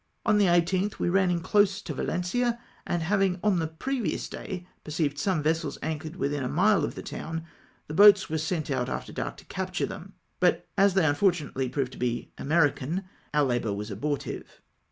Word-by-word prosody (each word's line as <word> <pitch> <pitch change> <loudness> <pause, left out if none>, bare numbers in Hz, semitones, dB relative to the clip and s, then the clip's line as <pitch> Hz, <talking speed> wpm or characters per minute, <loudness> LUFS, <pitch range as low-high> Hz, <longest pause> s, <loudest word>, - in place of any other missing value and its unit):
On 215 -2 +4
the 205 - +5
18th 180 +3 +2
we - - 0
ran 190 0 +3
in 175 -1 0
close 200 +1 +3
to - - -4
Valencia, 235 +7 -1 0.3
and 175 -1 0
liavhig 195 +1 +1
on 205 -4 +3
the 160 - 0
previous 240 - -2
day 180 -2 -6 0.2
perceived 150 -2 -1
some 175 -3 0
vessels 160 -1 0
anchored 160 +1 -4
within 145 -3 -1
a 125 - -2
mile 200 +5 +3
of - - -2
the - - -7
town, 165 0 -5 0.4
the 150 - -7
boats 205 +2 +7
were 160 0 -2
sent 155 -1 -2
off 125 -1 0
after - - -5
dark - - -4
to - - -14
capture - - -2
them, - - -8 0.3
but - - +2
as 195 -1 +4
they 190 - +4
unfor 155 +6 +4
tunately 135 -6 -4
proved 135 -3 -1
to - - -11
be 120 -1 -2
American, 155 +2 +1 0.3
our 150 0 +3
labour 120 -5 0
was 105 +2 -5
abortive. 140 +8 -4
165 Hz, 195 wpm, -27 LUFS, 145-195 Hz, 0.4 s, boats